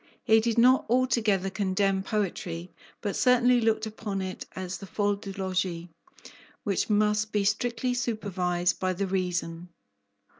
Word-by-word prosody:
He 220 Hz, -2 st, +5 dB
did 230 Hz, 0 st, -1 dB
not 255 Hz, +3 st, +5 dB
altogether 225 Hz, -6 st, +2 dB
condemn 190 Hz, 0 st, +1 dB
poetry, 185 Hz, -4 st, -3 dB, 0.3 s
but 205 Hz, -3 st, -2 dB
certainly 250 Hz, -1 st, +4 dB
looked 220 Hz, -1 st, +1 dB
upon 215 Hz, -2 st, -4 dB
it 185 Hz, -1 st, -5 dB
as 185 Hz, -1 st, -5 dB
the 195 Hz, -, -9 dB
folle 205 Hz, +1 st, 0 dB
du 200 Hz, 0 st, -8 dB
logis, 185 Hz, -3 st, -2 dB, 0.7 s
which 200 Hz, +1 st, -1 dB
must 210 Hz, 0 st, +2 dB
be 205 Hz, -1 st, +1 dB
strictly 235 Hz, +4 st, 0 dB
supervised 185 Hz, -7 st, -1 dB
by 185 Hz, 0 st, 0 dB
the 200 Hz, +2 st, -2 dB
reason. 180 Hz, -2 st, -2 dB
200 Hz, 140 wpm, -27 LUFS, 185-220 Hz, 0.7 s, He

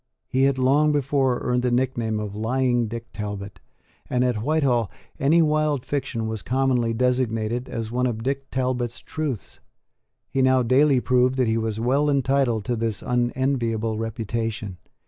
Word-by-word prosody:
He 130 Hz, +1 st, +2 dB
had 135 Hz, -1 st, +2 dB
long 140 Hz, +4 st, +3 dB
before 135 Hz, -3 st, +1 dB
earned 125 Hz, 0 st, +1 dB
the 125 Hz, -, +1 dB
nickname 120 Hz, -3 st, 0 dB
of 105 Hz, -1 st, -5 dB
Lying 120 Hz, +1 st, +1 dB
Dick 115 Hz, +1 st, -7 dB
Talbot; 105 Hz, -1 st, -6 dB, 0.5 s
and, 125 Hz, 0 st, +1 dB
at 120 Hz, -4 st, 0 dB
Whitehall, 130 Hz, -, +1 dB, 0.3 s
any 160 Hz, +5 st, +4 dB
wild 150 Hz, -3 st, +1 dB
fiction 130 Hz, -5 st, -2 dB
was 110 Hz, -2 st, -4 dB
commonly 125 Hz, -2 st, +1 dB
designated 120 Hz, -1 st, 0 dB
as 115 Hz, -1 st, -4 dB
one 125 Hz, +1 st, +1 dB
of 115 Hz, -2 st, -3 dB
Dick 135 Hz, +1 st, -2 dB
Talbot's 125 Hz, -2 st, -1 dB
truths. 150 Hz, -9 st, -5 dB, 0.7 s
He 135 Hz, -, -1 dB
now 130 Hz, -1 st, +4 dB
daily 130 Hz, +2 st, +4 dB
proved 125 Hz, +1 st, +2 dB
that 130 Hz, -2 st, +1 dB
he 110 Hz, 0 st, +1 dB
was 110 Hz, -1 st, -2 dB
well 135 Hz, +6 st, +2 dB
entitled 135 Hz, -5 st, +1 dB
to 120 Hz, -, 0 dB
this 110 Hz, -3 st, -2 dB
unenviable 120 Hz, -3 st, 0 dB
reputation. 115 Hz, -3 st, -3 dB
125 Hz, 155 wpm, -24 LUFS, 115-135 Hz, 0.7 s, any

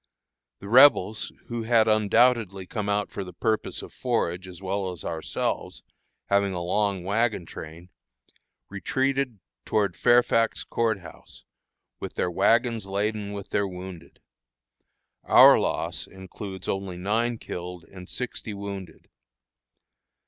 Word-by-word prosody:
The 100 Hz, -, -8 dB
Rebels, 110 Hz, -4 st, +5 dB
who 120 Hz, -1 st, -4 dB
had 115 Hz, -1 st, +3 dB
undoubtedly 110 Hz, -2 st, +3 dB
come 105 Hz, +1 st, -4 dB
out 100 Hz, 0 st, 0 dB
for 100 Hz, -, -4 dB
the 90 Hz, -1 st, -10 dB
purpose 110 Hz, +4 st, -1 dB
of -, -, -11 dB
forage 95 Hz, -7 st, -1 dB
as 90 Hz, -2 st, -10 dB
well 95 Hz, 0 st, -2 dB
as 90 Hz, -4 st, -9 dB
ourselves, 80 Hz, -1 st, -3 dB, 0.4 s
having 100 Hz, -1 st, +2 dB
a 90 Hz, -, -3 dB
long 100 Hz, 0 st, 0 dB
wagon 105 Hz, -1 st, 0 dB
train, 80 Hz, +3 st, -10 dB, 0.8 s
retreated 130 Hz, +4 st, -1 dB, 0.3 s
toward 100 Hz, -4 st, 0 dB
Fairfax 120 Hz, -1 st, +3 dB
Court 110 Hz, -4 st, -1 dB
House, -, -, -13 dB, 0.6 s
with -, -, -7 dB
their 90 Hz, -, 0 dB
wagons 115 Hz, +3 st, +2 dB
laden 105 Hz, +1 st, -2 dB
with 100 Hz, -1 st, -7 dB
their 100 Hz, -1 st, 0 dB
wounded. 90 Hz, -2 st, -9 dB, 1.0 s
Our -, -, +8 dB
loss -, -, -2 dB
includes 95 Hz, +1 st, -9 dB
only 95 Hz, -2 st, -3 dB
nine 115 Hz, +6 st, 0 dB
killed 90 Hz, -3 st, -7 dB
and 90 Hz, +1 st, -12 dB
sixty 120 Hz, -4 st, -4 dB
wounded. 100 Hz, -4 st, -8 dB
100 Hz, 125 wpm, -26 LUFS, 95-115 Hz, 1.0 s, Our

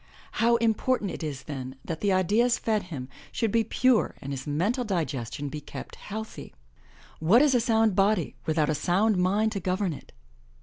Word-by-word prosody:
How 235 Hz, +1 st, +3 dB
important 230 Hz, -2 st, +1 dB
it -, -, -7 dB
is 150 Hz, -5 st, -4 dB
then 130 Hz, -3 st, -6 dB
that 160 Hz, -1 st, -4 dB
the 205 Hz, -, +2 dB
ideas 210 Hz, +6 st, +3 dB
fed 215 Hz, -2 st, 0 dB
him 130 Hz, -6 st, -5 dB, 0.2 s
should 225 Hz, -3 st, 0 dB
be 230 Hz, +1 st, +3 dB
pure 250 Hz, +1 st, +2 dB
and 140 Hz, +1 st, -5 dB
his 135 Hz, +1 st, -6 dB
mental 195 Hz, -, 0 dB
digestion 145 Hz, -, -3 dB
be 150 Hz, +2 st, -6 dB
kept 145 Hz, -, -9 dB
healthy. 220 Hz, +2 st, -8 dB, 0.6 s
What 200 Hz, -, +5 dB
is 290 Hz, -3 st, +4 dB
a 245 Hz, -, +4 dB
sound 225 Hz, -3 st, +2 dB
body 195 Hz, -3 st, +2 dB
without 155 Hz, -1 st, +2 dB
a 155 Hz, -, +1 dB
sound 190 Hz, +8 st, +2 dB
mind 200 Hz, +5 st, +2 dB
to 200 Hz, -, -3 dB
govern 185 Hz, 0 st, -1 dB
it? 140 Hz, -, -12 dB
195 Hz, 180 wpm, -27 LUFS, 155-225 Hz, 0.6 s, What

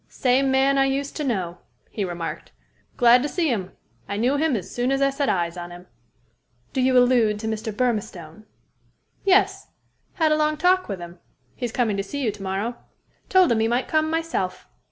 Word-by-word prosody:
"Same 265 Hz, +1 st, +1 dB
man 270 Hz, +1 st, +3 dB
I 270 Hz, -, +4 dB
used 275 Hz, +1 st, -2 dB
to 305 Hz, -, -2 dB
know," 185 Hz, -10 st, -2 dB, 0.3 s
he 210 Hz, -, -3 dB
remarked. 175 Hz, -2 st, -5 dB, 0.5 s
"Glad 245 Hz, +1 st, +6 dB
to 290 Hz, -, -2 dB
see 335 Hz, -1 st, 0 dB
him. 195 Hz, -7 st, -2 dB, 0.4 s
I 200 Hz, -, -2 dB
knew 245 Hz, +6 st, +1 dB
him 300 Hz, -2 st, +1 dB
as 190 Hz, -3 st, -5 dB
soon 245 Hz, +2 st, 0 dB
as 270 Hz, -, +1 dB
I 275 Hz, 0 st, +3 dB
set 275 Hz, 0 st, -1 dB
eyes 170 Hz, -1 st, -1 dB
on 175 Hz, 0 st, -6 dB
him." 175 Hz, +1 st, -11 dB, 0.9 s
"Do 260 Hz, -, 0 dB
you 255 Hz, 0 st, +3 dB
allude 245 Hz, -4 st, +4 dB
to 220 Hz, +1 st, -5 dB
Mr. 220 Hz, 0 st, -3 dB
Burmistone?" 210 Hz, -6 st, -3 dB, 0.8 s
"Yes. 390 Hz, 0 st, +3 dB, 0.5 s
Had 320 Hz, -4 st, +1 dB
a -, -, +4 dB
long 305 Hz, 0 st, +1 dB
talk 365 Hz, +3 st, +3 dB
with 195 Hz, -2 st, -4 dB
him. 175 Hz, 0 st, -10 dB, 0.4 s
He's 240 Hz, -2 st, -4 dB
coming 225 Hz, -5 st, 0 dB
to 195 Hz, -, -1 dB
see 285 Hz, +8 st, -6 dB
you 225 Hz, -, +1 dB
to 205 Hz, -1 st, -13 dB
morrow. 195 Hz, +5 st, -3 dB, 0.5 s
Told 370 Hz, -5 st, +5 dB
him 225 Hz, -, +2 dB
he 220 Hz, -, +2 dB
might 240 Hz, +2 st, 0 dB
come, 310 Hz, 0 st, +1 dB
myself. 320 Hz, -, -2 dB
245 Hz, 195 wpm, -23 LUFS, 200-275 Hz, 0.9 s, Glad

